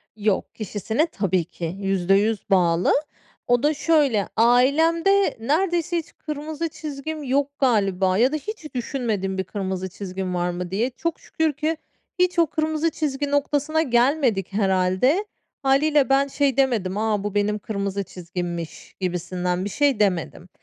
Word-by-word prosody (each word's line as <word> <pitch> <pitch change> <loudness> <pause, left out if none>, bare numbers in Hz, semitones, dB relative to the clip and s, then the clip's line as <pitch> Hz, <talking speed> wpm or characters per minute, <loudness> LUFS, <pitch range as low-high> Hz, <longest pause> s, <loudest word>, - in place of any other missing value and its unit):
Yok, 210 -2 -1
kişisine 220 - -1
tabii 190 - -1
ki 170 +1 -6
%100 195 +3 +1
bağlı. 175 -2 +3 0.5
O 245 +1 +3
da 300 +1 +3
şöyle, 290 - +2
ailemde 320 - +4
neredeyse 345 +5 0
hiç 325 - -7
kırmızı 305 +2 -4
çizgim 305 0 -6
yok 280 +2 -1
galiba 195 -7 +2
ya 255 +5 +4
da - - +1
hiç 315 -3 -7
düşünmedim 220 -7 -2
bir 190 - 0
kırmızı 190 -1 -4
çizgim 185 -1 -5
var 175 0 0
mı 175 0 -5
diye. 230 +7 0
Çok 335 +6 -4
şükür 320 -1 -1
ki 310 +3 -1 0.4
hiç 360 -1 +2
o 335 - +5
kırmızı 315 +1 0
çizgi 290 -2 -2
noktasına 290 +2 +1
gelmedik 240 - +2
herhâlde. 195 - +2 0.4
Hâliyle 280 +1 +3
ben 275 +1 +4
şey 280 -1 0
demedim, 215 -8 +1
"A, 215 -2 0
bu 205 -1 -3
benim 210 +1 +1
kırmızı 200 -1 -3
çizgimmiş." 175 -2 -6
gibisinden 180 0 -2
bir 205 - -3
şey 280 -4 +1
demedim. 180 -2 0
235 Hz, 145 wpm, -23 LUFS, 190-300 Hz, 0.5 s, o